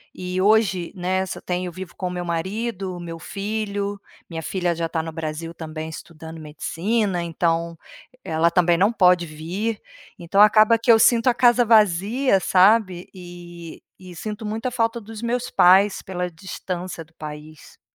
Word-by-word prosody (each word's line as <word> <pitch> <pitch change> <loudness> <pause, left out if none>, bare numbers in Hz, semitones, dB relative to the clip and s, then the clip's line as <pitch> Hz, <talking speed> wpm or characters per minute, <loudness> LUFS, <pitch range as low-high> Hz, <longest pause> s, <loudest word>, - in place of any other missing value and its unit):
e 180 0 -4
hoje, 195 -4 +2
né, 185 +1 -1
só 185 - -7
tenho 180 0 -3
vivo 185 +1 -9
com 185 - -3
o - - -4
meu 180 0 -4
marido, 190 +3 -3
o - - -8
meu 165 -1 -7
filho, 200 +1 -4 0.3
minha 165 -2 -5
filha 175 0 -1
já 165 0 -2
está 165 0 -2
no 165 - -6
Brasil 160 +1 -5
também, 160 -1 -7
estudando 160 0 -10
medicina, 175 +5 -2
então 170 0 -1 0.5
ela 160 +1 +1
também 175 0 +3
não 200 +6 +3
pode 180 -4 +4
vir, 175 +8 -4 0.4
então 175 +3 -1
acaba 215 +2 +6
que 230 +1 +4
eu 225 - +6
sinto 230 0 +4
a 250 - +5
casa 245 -1 +4
vazia, 215 +2 +3
sabe, 185 -1 +3
e 175 -2 -11 0.2
e 185 -1 -12
sinto 215 +5 -6
muita 225 +4 -3
falta 230 -1 0
dos 220 +1 -10
meus 240 +1 -2
pais 190 +3 +5
pela 180 -1 -4
distância 180 0 -6
do 160 - -30
país. 150 0 -11
180 Hz, 165 wpm, -22 LUFS, 170-210 Hz, 0.5 s, acaba